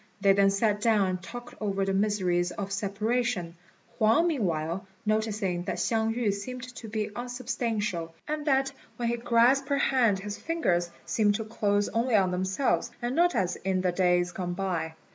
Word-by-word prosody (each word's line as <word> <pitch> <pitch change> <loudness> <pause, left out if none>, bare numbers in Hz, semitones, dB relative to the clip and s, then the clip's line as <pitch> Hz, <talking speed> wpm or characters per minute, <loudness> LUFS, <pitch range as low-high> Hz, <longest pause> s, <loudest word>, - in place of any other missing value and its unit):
They 195 -1 +5
then 195 0 +4
sat 205 +1 +1
down 215 -4 +3
and 185 -1 -3
talked 240 +5 -9
over 195 -2 0
the 195 - 0
miseries 190 -3 +1
of 195 +2 -5
separation, 205 -2 -1 0.4
Huang 225 +10 +4
meanwhile 185 - -1 0.2
noticing 215 -4 0
that - - -2
Hsiang 225 -1 +1
yü 230 -4 +1
seemed 250 +5 -6
to 225 - -8
be 215 -1 -3
unsubstantial, 230 -8 -3
and 305 0 -3
that 270 -1 +3 0.3
when 240 -2 -1
he 235 - 0
grasped 245 +4 +3
her 280 - +2
hand 245 -7 +3
his 205 +1 -6
fingers 180 - 0 0.2
seemed 205 -2 +2
to 220 - -3
close 205 -2 +1
only 230 +1 +1
on 190 -3 +3
themselves, 190 +8 0
and 240 +2 -2
not 350 +1 +3
as 180 -1 0
in 190 -1 -1
the 180 -1 +1
days 180 -1 +2
gone 175 -1 -4
by. 170 -4 -2
210 Hz, 175 wpm, -28 LUFS, 190-240 Hz, 0.4 s, They